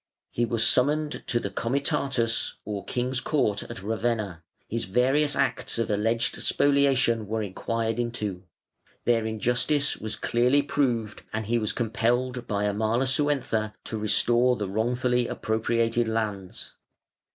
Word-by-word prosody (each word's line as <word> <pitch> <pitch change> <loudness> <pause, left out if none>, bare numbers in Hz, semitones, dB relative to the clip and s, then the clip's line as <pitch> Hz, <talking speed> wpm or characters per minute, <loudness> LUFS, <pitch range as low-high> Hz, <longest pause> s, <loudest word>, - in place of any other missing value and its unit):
He 120 - 0
was 115 -1 +1
summoned 150 +4 +2
to 120 - +1
the 100 - -4
Comitatus 130 -1 0
or 105 -2 -4
King's 125 +1 -1
Court, 120 -9 0
at 120 -5 -8
Ravenna; 110 -4 -1 0.3
his 115 -1 -2
various 135 +9 +2
acts 140 - 0
of 115 -2 0
alleged 115 +3 0
spoliation 135 -6 +2
were 110 +1 -1
inquired 115 +3 -2
into; 105 -6 -3 0.6
their 115 -2 +2
injustice 120 +6 +1
was 110 0 -2
clearly 125 +4 +2
proved, 120 -7 -1
and 110 0 -3
he 120 +3 +1
was 110 -2 0
compelled 120 +2 -1
by 105 -1 -1
Amalasuentha 115 +1 0
to 110 - -4
restore 120 +4 +3
the 105 -4 -3
wrongfully 120 +4 0
appropriated 115 +1 0
lands. 105 -4 -3
115 Hz, 130 wpm, -26 LUFS, 110-125 Hz, 0.6 s, restore